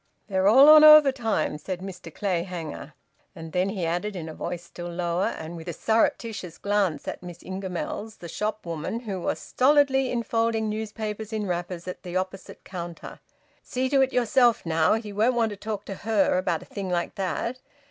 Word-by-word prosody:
"They're 190 0 +2
all 265 +7 +8
on 310 0 +10
overtime," 265 - +6
said 180 +3 -5
Mr 180 -3 -8
Clayhanger; 170 -5 -4 0.4
and 165 -2 -9
then 180 +3 +1
he 195 -4 -2
added, 180 +5 -2
in 165 -3 -5
a 160 - -7
voice 175 +1 -5
still 175 0 -8
lower, 175 +1 -1
and 160 +2 -6
with 165 0 -9
a 170 - -3
surreptitious 220 -4 0
glance 200 -7 0
at - - -5
Miss 175 -1 -10
Ingamells, 190 +3 -5
the 170 - -9
shop 210 +4 -3
woman, 170 +7 -4
who 200 -6 -5
was - - -1
stolidly 270 -1 +3
enfolding 230 -2 0
newspapers 215 0 -4
in 215 -1 -2
wrappers 175 -1 -4
at 180 - -6
the 180 -1 -7
opposite 185 +1 -4
counter, 175 -2 -8 0.4
"See 260 +1 -2
to 275 -1 +4
it 265 0 +2
yourself, 240 -2 +3
now. 160 +3 +3
He 215 -2 -5
won't 225 +5 +2
want 225 -2 +1
to - - -5
talk 205 0 -5
to 195 - -5
her 205 -1 +1
about 175 -3 -1
a - - -15
thing 195 -2 -5
like 175 -1 -1
that. 215 +6 -3
195 Hz, 185 wpm, -26 LUFS, 175-225 Hz, 0.4 s, on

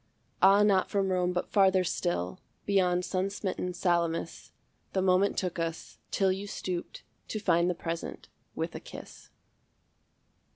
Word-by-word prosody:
Ah, 200 +2 +7
not 195 -3 +3
from 195 -1 +1
Rome 180 -1 +1
but 180 0 -3
farther 190 -2 +4
still, 90 - -2 0.3
Beyond 180 -3 +2
sun 185 +1 -1
smitten 190 -2 -3
Salamis, 170 -2 -1 0.4
The 190 - +1
moment 190 +2 +3
took 180 -2 -2
us, 165 0 -4
till 195 -1 +2
you 195 +2 -3
stooped 180 -3 -5 0.2
To 215 - -3
find 170 -3 +3
the 180 - 0
present 165 0 -5 0.3
with - - -3
a - - -5
kiss. - - -11
185 Hz, 140 wpm, -29 LUFS, 175-195 Hz, 0.4 s, Ah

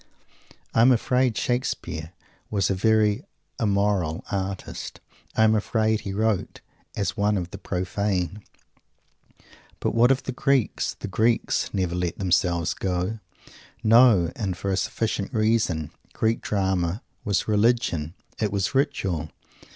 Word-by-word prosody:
I 115 - +4
am 125 +3 +7
afraid 125 0 +2
Shakespeare 90 -10 -2 0.4
was 100 -3 +1
a - - +3
very 105 +1 +2 0.4
"immoral" 100 -6 +1
artist. 95 -1 -4 0.4
I 110 - +4
am 110 0 +5
afraid 110 0 +1
he 100 - -5
wrote 105 0 -1 0.3
as 95 -3 -1
one 105 0 +1
of 90 -1 -4
the 100 - -8
profane. 95 +1 -2 1.4
But - - -1
what 115 +2 +5
of 135 0 +2
the - - -3
Greeks? 135 -1 0
The - - -6
Greeks 110 +5 +1
never 95 -4 -1
let 90 -1 -2
themselves 90 -2 +1
go! 95 +3 -2 0.6
No! 110 -7 +6
And 95 -6 -3
for 100 - -2
a - - +2
sufficient 105 0 -2
reason. 110 -9 +1 0.2
Greek 110 +1 0
Drama 95 -1 -1 0.2
was 100 -2 0
Religion. 105 -7 +1 0.2
It 105 -3 0
was 100 -1 -1
Ritual. 90 - 0
100 Hz, 130 wpm, -25 LUFS, 90-110 Hz, 1.4 s, am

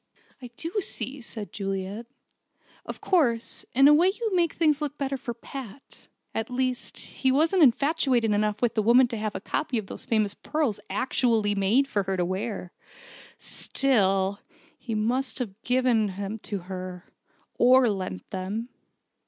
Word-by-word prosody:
"I 250 - -7
do 330 - -4
see," 280 -5 -4
said 220 -3 -8
Juliet. 195 +3 -4 0.8
"Of - - -7
course, 245 - +1
in 270 +2 +7
a 295 - +8
way 335 +5 +5
you 430 +1 -1
make 340 -2 +2
things 305 -3 +2
look 295 -1 -3
better 275 -1 -1
for 240 -2 -5
Pat. 260 +1 -9 0.3
At 225 +2 -2
least, 255 0 -2
he 265 - -1
wasn't 325 +7 +3
infatuated 270 -4 +3
enough 210 +2 0
with 240 - +2
that 220 - +1
woman 240 +4 +6
to 230 - -4
have 215 -1 -3
a - - -2
copy 255 +5 -2
of 215 - -2
those - - -7
famous 215 -3 +1
pearls 290 -4 -1
actually 230 -5 +1
made 205 +8 +2
for 205 -7 0
her 190 -1 -2
to 175 - +1
wear. 190 0 -4 0.6
Still, 200 -7 +1 0.4
he 230 -3 -5
must 245 +5 0
have 225 -4 -5
given 245 -3 +2
them 200 +2 -4
to 205 -2 -5
her 185 0 -7 0.5
or 255 +1 +6
lent 185 - -3
them." 200 +6 -4
235 Hz, 160 wpm, -26 LUFS, 205-270 Hz, 0.8 s, a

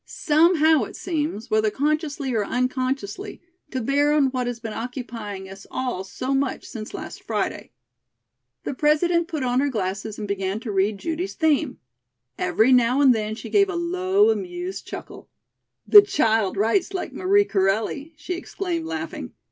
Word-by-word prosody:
Somehow, 315 -3 +3
it - - -11
seems, 295 - -3
whether 215 0 +3
consciously 290 0 -1
or 220 -2 +1
unconsciously, 255 - -2 0.3
to 260 - -3
bear 285 +4 +2
on 285 -3 +3
what 255 -1 -2
has 245 -1 -4
been 225 -2 -6
occupying 225 -5 -6
us 195 +1 -11
all 250 -8 -3
so 255 +7 -3
much 270 0 -1
since 215 -3 -7
last - - -7
Friday." - - -3 0.9
The - - -3
President 330 +4 +2
put 315 -6 -3
on 250 0 +1
her 285 +1 +2
glasses 210 -1 -3
and 210 - -5
began 195 0 -2
to 225 - -4
read 200 +1 +1
Judy's 335 - -3
theme. 310 -4 +1 0.6
Every 210 - +3
now 250 +1 +4
and 270 -3 +6
then 215 -1 -2
she - - -9
gave 395 -1 +4
a 380 - -3
low, 370 +5 +2
amused 360 -2 -4
chuckle. - - -9 0.6
"The 415 - +11
child 225 - +1
writes 285 - +1
like 365 - -4
Marie 400 +2 +3
Corelli," 220 - 0
she 295 +5 -4
exclaimed, 345 -2 -4
laughing. 320 -1 -5
270 Hz, 160 wpm, -23 LUFS, 220-330 Hz, 0.9 s, The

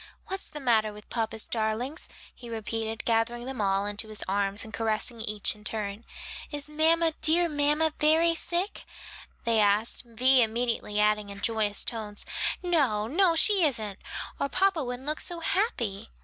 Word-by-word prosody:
"What's 385 0 -4
the 300 - -7
matter 225 -5 +2
with 210 0 -14
papa's 225 -2 -2
darlings?" 230 +7 -2 0.2
he 240 - -11
repeated, 225 0 -3
gathering 235 +1 0
them 265 -3 -4
all 195 0 +1
into 205 +1 -3
his 215 -1 -4
arms, 200 +1 -1
and 220 - -11
caressing 225 +1 -2
each 210 -2 0
in 210 -1 -18
turn. 210 0 -4 0.4
"Is 290 -1 -4
mamma, 325 +1 +3
dear 340 +2 +4
mamma, 300 +1 +2
very 320 +2 +4
sick?" 350 +4 -1 0.6
they 230 -1 +3
asked, 210 +2 +2
Vi 255 +2 +3
immediately 230 -2 0
adding 210 -1 +2
in 200 0 -8
joyous 215 -2 0
tones, 215 -3 -4 0.4
"No, 275 -12 +2
no, 335 - +3
she 395 +2 +6
isn't, 215 -9 0 0.4
or 280 - -1
papa 385 -3 +2
wouldn't 250 +1 -5
look 305 +1 -2
so 345 -1 -3
happy." 235 - -1
230 Hz, 160 wpm, -28 LUFS, 215-305 Hz, 0.6 s, she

